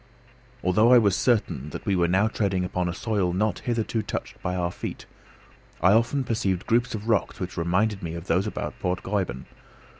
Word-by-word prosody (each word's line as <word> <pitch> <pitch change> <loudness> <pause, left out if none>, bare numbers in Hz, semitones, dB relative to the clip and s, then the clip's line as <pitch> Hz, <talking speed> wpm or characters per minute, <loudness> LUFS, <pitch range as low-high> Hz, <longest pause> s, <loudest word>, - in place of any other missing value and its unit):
Although 105 +6 +4
I 125 - +9
was 100 -5 +4
certain 95 - +1
that - - -8
we 100 -3 +1
were 85 -1 +3
now 95 +5 +3
treading 95 -4 0
upon 90 0 -1
a - - -1
soil 100 -5 0
not 105 +3 0
hitherto 115 -2 -1
touched - - -6
by 90 - -2
our 85 -1 -1
feet, - - -6 0.7
I 90 +4 +5
often 120 +5 +2
perceived 100 -7 -1
groups 120 +1 +1
of 105 +1 -6
rocks 110 -4 +1
which 90 -1 -5
reminded 95 +5 +1
me 85 -1 -4
of 85 0 -7
those 95 +3 +1
about - - -4
Port 90 0 -2
Gräuben. 95 -11 -2
95 Hz, 190 wpm, -25 LUFS, 90-110 Hz, 0.7 s, I